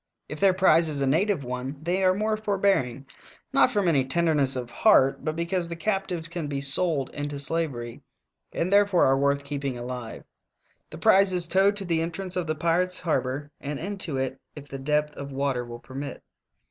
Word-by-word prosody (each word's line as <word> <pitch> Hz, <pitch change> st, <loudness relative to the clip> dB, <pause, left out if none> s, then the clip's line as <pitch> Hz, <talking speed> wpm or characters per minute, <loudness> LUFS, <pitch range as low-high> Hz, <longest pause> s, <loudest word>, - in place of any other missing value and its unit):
If 150 Hz, -, -7 dB
their 195 Hz, -2 st, +4 dB
prize 170 Hz, -3 st, +4 dB
is 145 Hz, -2 st, -3 dB
a -, -, +2 dB
native 170 Hz, +4 st, +1 dB
one 125 Hz, +3 st, -5 dB
they 175 Hz, +5 st, -1 dB
are 185 Hz, 0 st, +4 dB
more 215 Hz, +2 st, 0 dB
forbearing, 195 Hz, -, 0 dB, 0.5 s
not -, -, +5 dB
from 205 Hz, -3 st, 0 dB
any 145 Hz, -6 st, +3 dB
tenderness 145 Hz, -1 st, +2 dB
of 125 Hz, -2 st, -5 dB
heart, 135 Hz, -, +3 dB
but 155 Hz, +1 st, -2 dB
because 170 Hz, +1 st, -2 dB
the 170 Hz, -, -4 dB
captives 190 Hz, -3 st, -2 dB
can 170 Hz, -2 st, -5 dB
be 140 Hz, -1 st, -3 dB
sold 140 Hz, 0 st, +1 dB
into 145 Hz, 0 st, -4 dB
slavery, 140 Hz, -5 st, -2 dB, 0.5 s
and 180 Hz, +4 st, -1 dB
therefore 200 Hz, -3 st, +4 dB
are 135 Hz, -, +4 dB
worth 140 Hz, +1 st, +1 dB
keeping 140 Hz, -2 st, -4 dB
alive. 120 Hz, -1 st, -6 dB, 0.7 s
The -, -, -9 dB
prize 195 Hz, 0 st, +4 dB
is 175 Hz, -1 st, +3 dB
towed 195 Hz, +3 st, +3 dB
to 195 Hz, -, -4 dB
the 165 Hz, -2 st, 0 dB
entrance 175 Hz, +3 st, -4 dB
of 180 Hz, -2 st, -2 dB
the 155 Hz, -, -1 dB
pirates' 175 Hz, +3 st, 0 dB
har 160 Hz, -6 st, +1 dB
bor 135 Hz, +4 st, -5 dB
and 145 Hz, 0 st, -5 dB
into 180 Hz, -4 st, -3 dB
it 130 Hz, 0 st, -3 dB, 0.2 s
if 145 Hz, -1 st, -10 dB
the 135 Hz, -1 st, -7 dB
depth 150 Hz, +2 st, 0 dB
of 140 Hz, 0 st, -7 dB
water 135 Hz, -2 st, -1 dB
will 120 Hz, 0 st, -8 dB
permit. 135 Hz, +3 st, -8 dB
155 Hz, 195 wpm, -26 LUFS, 135-180 Hz, 0.7 s, not